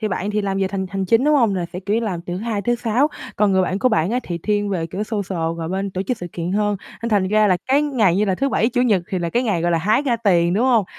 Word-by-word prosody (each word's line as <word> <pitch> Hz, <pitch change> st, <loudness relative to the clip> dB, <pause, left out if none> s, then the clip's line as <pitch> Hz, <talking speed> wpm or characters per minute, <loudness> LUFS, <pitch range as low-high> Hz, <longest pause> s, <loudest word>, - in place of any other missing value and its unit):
thì 215 Hz, -, -1 dB
bạn 195 Hz, +2 st, -2 dB
thì 210 Hz, 0 st, 0 dB
làm 195 Hz, -1 st, -1 dB
về 190 Hz, -1 st, 0 dB
thành 190 Hz, -1 st, -3 dB
hành 195 Hz, -1 st, -2 dB
chính, 230 Hz, +8 st, +3 dB
đúng 300 Hz, 0 st, +4 dB
hông? 230 Hz, -8 st, +3 dB
Là 180 Hz, -2 st, -2 dB
sẽ, 180 Hz, -, -5 dB
kiểu 200 Hz, +2 st, -1 dB
như, -, -, +1 dB
làm 190 Hz, -7 st, -3 dB
từ 175 Hz, 0 st, -6 dB
thứ -, -, -4 dB
Hai 215 Hz, -1 st, -3 dB
tới 240 Hz, +3 st, +1 dB
thứ 240 Hz, -, -19 dB
Sáu, 245 Hz, +6 st, +2 dB, 0.3 s
còn 205 Hz, -1 st, +3 dB
người 190 Hz, 0 st, +3 dB
bạn 185 Hz, +2 st, -1 dB
của 255 Hz, -, +3 dB
bạn 190 Hz, -6 st, +1 dB
á, 245 Hz, -, +1 dB
thì 175 Hz, -5 st, -5 dB
thiên 205 Hz, +3 st, -1 dB
về, 170 Hz, -4 st, -2 dB
kiểu, 195 Hz, +5 st, -4 dB
social 200 Hz, -4 st, -3 dB, 0.2 s
và 165 Hz, -1 st, -4 dB
bên 195 Hz, +1 st, -2 dB
tổ 185 Hz, +1 st, -3 dB
chức 245 Hz, +6 st, -2 dB
sự 175 Hz, -, -6 dB
kiện 175 Hz, +2 st, -3 dB
hơn 205 Hz, 0 st, +1 dB, 0.3 s
nên 235 Hz, -, -1 dB
thành 200 Hz, -4 st, +2 dB
ra 215 Hz, 0 st, +3 dB
là 185 Hz, -2 st, +3 dB
cái 280 Hz, +3 st, +4 dB
ngày 230 Hz, -, +2 dB
như 210 Hz, -, +2 dB
là 190 Hz, -2 st, +1 dB
thứ 275 Hz, +7 st, 0 dB
Bảy, 225 Hz, -2 st, +1 dB
Chủ 245 Hz, 0 st, 0 dB
nhật 210 Hz, -8 st, +2 dB
thì 185 Hz, -, -2 dB
là 170 Hz, -1 st, -2 dB
cái 245 Hz, -, +1 dB
ngày, 195 Hz, -8 st, 0 dB
gọi 175 Hz, -, +1 dB
là, 165 Hz, -, +2 dB
hái 215 Hz, -, +2 dB
ra 250 Hz, -5 st, +1 dB
tiền, 175 Hz, -6 st, +2 dB
đúng 225 Hz, +6 st, +2 dB
hông? 235 Hz, -6 st, +3 dB
205 Hz, 340 wpm, -20 LUFS, 185-230 Hz, 0.3 s, đúng